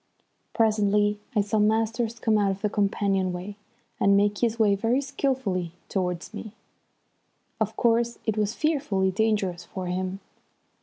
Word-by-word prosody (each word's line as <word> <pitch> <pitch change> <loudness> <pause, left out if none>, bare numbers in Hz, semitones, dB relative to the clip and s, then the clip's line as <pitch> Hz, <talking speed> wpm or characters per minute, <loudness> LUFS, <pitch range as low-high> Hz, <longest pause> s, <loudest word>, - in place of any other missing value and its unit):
Presently 210 -2 +2 0.2
I 210 - +4
saw 205 +2 0
Masters 225 +2 +1
come 220 -1 +1
out 205 -2 +3
of 195 0 -3
the 210 - +1
companion 195 -2 +1
way 185 +3 -6 0.4
and 200 0 +4
make 205 0 +2
his 230 -1 +1
way 215 -3 +4
very 225 +6 +1
skilfully 255 - -1 0.2
towards 180 -3 -2
me. 215 -2 -7 1.1
Of - - -1
course 235 0 +2
it 220 - 0
was 215 +1 0
fearfully 240 -12 +1
dangerous 195 -4 0
for 185 +2 -6
him. 185 +1 -3
205 Hz, 145 wpm, -26 LUFS, 195-225 Hz, 1.1 s, I